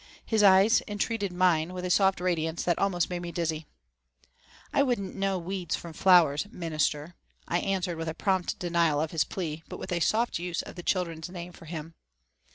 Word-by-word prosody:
His 220 -2 +2
eyes 195 +2 +6
entreated 205 -1 -2
mine 180 -2 +2
with 180 0 -5
a 180 - -1
soft 190 0 +3
radiance 165 -2 -1
that 175 - +1
almost 180 -3 +1
made 175 -1 -3
me 175 -1 -5
dizzy. 160 -3 -2 1.1
"I - - +4
wouldn't 240 -8 0
know 195 -1 0
weeds 180 0 -3
from 170 -1 -8
flowers, 175 -2 +4
'Minister,'" 155 -1 -2 0.3
I 175 - +1
answered 185 -3 -1
with 165 -1 -4
prompt 190 -3 0
denial 170 -4 +1
of 155 +1 -1
his 165 - +2
plea, 160 -4 -5
but - - -6
with 185 - -7
a 175 - +1
soft 220 +4 +1
use 175 -1 -3
of - - -10
the 175 - -8
children's 170 -2 -2
name 175 -1 -8
for 165 - -14
him. 160 0 -7
175 Hz, 185 wpm, -28 LUFS, 165-190 Hz, 1.1 s, eyes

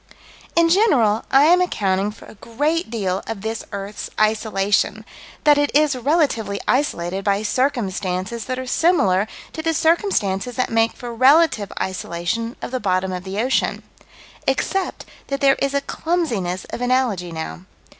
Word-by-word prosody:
In 335 0 +4
general 270 - +3
I 270 +1 +5
am 350 +4 +5
accounting 200 - 0
for 210 - -12
a - - -13
great 290 - -2
deal 195 -5 -2
of 225 -3 -5
this 220 +1 -4
earth's 200 +1 -6
isolation: 215 -1 +1 0.4
that 295 -1 +5
it 290 -1 +2
is 300 -2 +4
relatively 255 -7 0
isolated 195 -9 0
by 200 +1 +1
circumstances 215 -4 -1
that 255 -1 -3
are 260 - -4
similar 220 - +2 0.3
to 320 - -4
the 325 0 0
circumstances 250 - +1
that 255 - -1
make 225 0 +2
for 240 -1 -7
relative 260 -3 +4
isolation 190 +5 -3
of - - -5
the 255 - -1
bottom 185 -3 0
of 180 0 -5
the 190 +1 -6
ocean 255 +4 0 0.6
except 385 -1 -1 0.2
that 275 0 -2
there 275 -1 +5
is 275 0 0
a 280 - +2
clumsiness 235 - -2
of - - -5
analogy 245 -8 0
now. 165 +2 -6
230 Hz, 155 wpm, -21 LUFS, 195-285 Hz, 0.6 s, I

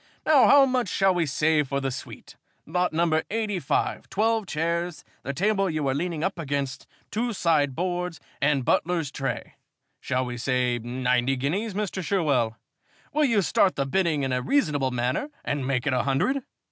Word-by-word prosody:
Now 300 -4 +6
how 280 -1 +7
much 255 -6 0
shall 195 0 +3
we 175 -3 0
say 155 +2 +2
for 140 -1 -2
the 135 -1 -2
suite? 130 - -9 0.3
Lot 180 +3 0
number 160 -1 +2
85 210 -4 -1
twelve 220 0 +1
chairs, 170 +2 -2 0.2
the 140 - -3
table 195 +5 +1
you 155 -3 -1
are 135 - +1
leaning 165 +2 -2
up 190 -1 -1
against, 140 -3 -3 0.2
two 235 +2 -1
sideboards, 170 +1 0 0.2
and 140 -3 +2
butler's 165 -2 +1
tray. 135 -1 -4 0.5
Shall 130 0 -1
we 125 0 -5
say 125 0 0
ninety 125 +2 0
guineas, 185 - -2
Mr. 200 -2 -2
Sherwell? 140 - +1 0.6
Will 300 0 +3
you 225 -7 +2
start 180 +4 +3
the 140 - 0
bidding 160 -1 +1
in 135 -1 -1
a 125 - 0
reasonable 145 - +1
manner 125 - -1 0.2
and 140 -2 -2
make 130 -1 0
it 145 - +1
a 125 - +2
hundred?" 180 - +1
155 Hz, 170 wpm, -26 LUFS, 135-190 Hz, 0.6 s, how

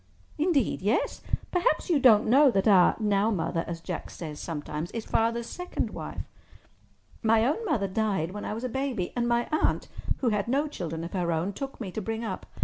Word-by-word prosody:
"Indeed, 305 - +2
yes. 210 +5 0 0.3
Perhaps 365 +1 +1
you 310 - +4
don't 225 -5 +6
know 275 +5 +6
that 195 -4 +1
our 190 -4 +6
'now 210 0 +2
mother,' 165 -4 -1
as 170 -1 -5
Jack - - -5
says 155 -3 -7
sometimes, 155 0 -4
is 230 -1 -4
Father's 230 +1 +1
second 360 +8 -4
wife. - - -6 1.0
My 225 0 +4
own 305 - 0
mother 240 - +1
died 190 -4 0
when 205 +1 -6
I 210 - -3
was 230 - -6
a - - 0
baby, 255 -7 -2
and 240 -1 0
my 235 0 +1
aunt, 310 - +1 0.3
who 250 - +1
had 210 -1 0
no 280 +5 +1
children 165 - -5
of 170 - -7
her 175 -3 0
own, 170 +5 -1
took 275 +6 -6
me 205 -6 -5
to 220 - -4
bring 225 +2 -3
up. 205 -5 -5
220 Hz, 200 wpm, -28 LUFS, 185-255 Hz, 1.0 s, don't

